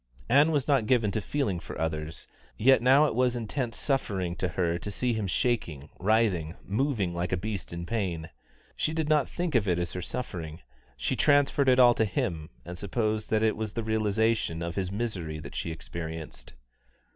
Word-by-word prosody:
Ann 145 +4 +6
was 145 -4 0
not 135 -7 +3
given 115 -5 +3
to 110 - -1
feeling 105 -9 -1
for 75 - -8
others, 80 0 -3 0.3
yet 130 +4 +5
now 135 +4 +6
it - - 0
was 125 +1 +2
intense 120 +1 -3
suffering 95 - -1
to 90 - 0
her 85 -1 -1
to 105 - -5
see 120 +4 0
him 110 -3 -2
shaking, 85 - -1
writhing, 95 -5 +1
moving 105 -4 0
like 85 +1 -2
a 95 - +1
beast 100 0 -4
in 85 0 -5
pain. 90 -7 -2 0.5
She 155 - -1
did 160 -2 0
not 150 -3 +3
think 175 -2 -3
of 115 -5 +2
it 90 -2 +2
as 85 -1 -2
her 90 - -4
suffering; 85 -7 -5 0.4
she - - -1
transferred 145 -1 +3
it 125 - +5
all 125 -2 +7
to 110 - +1
him, 80 -5 -2 0.2
and 90 +1 -7
supposed 110 +2 -1
that 110 0 +2
it 110 - +3
was 110 -1 -4
the 115 - -2
realisation 110 -5 +1
of 85 0 -3
his 95 0 -2
misery 95 -8 -3
that 75 -2 -9
she - - -3
experienced. 80 0 -7
105 Hz, 190 wpm, -28 LUFS, 85-125 Hz, 0.5 s, all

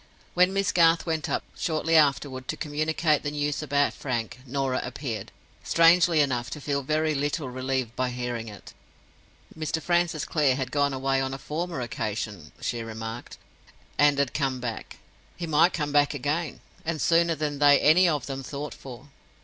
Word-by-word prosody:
When 180 +1 +4
Miss 195 0 +1
Garth 165 -1 +4
went 160 -2 -2
up - - -1
shortly 165 0 0
afterward 140 -3 +2
to - - -3
communicate 155 0 0
the 145 - -2
news 145 0 -2
about 145 -1 +1
Frank, 120 -2 -4
Norah 135 0 -1
appeared, 115 -8 -5 0.3
strangely 165 -1 +5
enough, 125 -4 0
to 150 - -6
feel 140 -1 -1
very 155 +3 0
little 145 0 -2
relieved 130 -2 -2
by 130 0 0
hearing 120 -2 -4
it. 105 -2 -11 0.8
Mr. 160 0 -2
Francis 170 -2 0
Clare 145 -5 +2
had 130 -2 -3
gone 145 -1 +2
away 135 0 0
on 135 0 -2
a - - -6
former 160 +2 -4
occasion 105 - -4
(she 120 - -2
remarked), 115 +1 -7 0.6
and 145 -1 +5
had 140 -2 0
come 135 -3 -1
back. 120 -3 -6 0.4
He 175 - -4
might 160 +3 +4
come 150 -4 -2
back 145 0 +3
again, 150 +4 -2 0.2
and 160 -1 -2
sooner 170 +1 +3
than 145 -1 -3
they 145 -1 +6
any 175 +4 +5
of 145 -5 -1
them 135 -1 -5
thought 140 +2 -6
for. 130 +2 -11
145 Hz, 170 wpm, -26 LUFS, 130-155 Hz, 0.8 s, they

